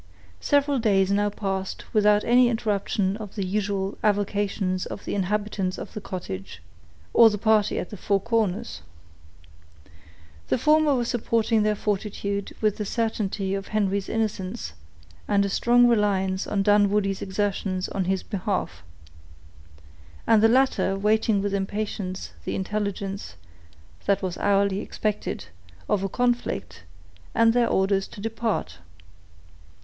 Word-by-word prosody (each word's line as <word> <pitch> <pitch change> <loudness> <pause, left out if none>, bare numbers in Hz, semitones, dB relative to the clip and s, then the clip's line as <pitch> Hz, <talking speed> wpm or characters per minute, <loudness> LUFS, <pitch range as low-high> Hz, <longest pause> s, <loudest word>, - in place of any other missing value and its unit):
Several 285 -1 +2
days 195 -4 +2
now 205 +1 +2
passed 195 -2 -4
without 210 -1 +4
any 245 +1 +5
interruption 205 -3 0
of 210 -3 -9
the 200 -3 -2
usual 195 0 -2
avocations 200 -2 0
of - - -8
the - - -3
inhabitants 200 -1 -1
of - - -8
the 210 - -6
cottage, 95 - -6 0.5
or 230 -1 +8
the 210 - -2
party 215 0 +2
at - - -4
the 210 - -7
Four 200 +2 +1
Corners. 215 - -1 1.7
The - - +1
former 305 +2 +4
were 240 -2 0
supporting 230 -2 +1
their 210 0 +2
fortitude 200 -1 -3
with 215 -2 +1
the 210 - -2
certainty 205 -3 -2
of 195 0 -3
Henry's 200 -2 0
innocence, 215 -1 -3 0.5
and 200 -1 +3
a - - -1
strong 240 +4 +4
reliance 195 -4 +1
on 200 -1 0
Dunwoodie's 205 -1 +2
exertions 190 -1 -2
in 190 -2 -2
his 190 +1 0
behalf, 185 - -3 1.4
and 220 -2 +5
the 225 - +7
latter 255 -6 +2
waiting 210 0 +2
with 205 -1 -1
impatience 200 -1 -3
the - - -3
intelligence, 195 - -3 0.7
that 200 0 +2
was 180 -2 -2
hourly 200 -1 +2
expected, 210 0 -3 0.4
of 195 - +1
a 195 - -2
conflict, 245 - -1 0.5
and 230 0 +5
their 240 -1 +3
orders 195 0 +1
to - - -12
depart. 225 0 -2
205 Hz, 135 wpm, -25 LUFS, 195-220 Hz, 1.7 s, or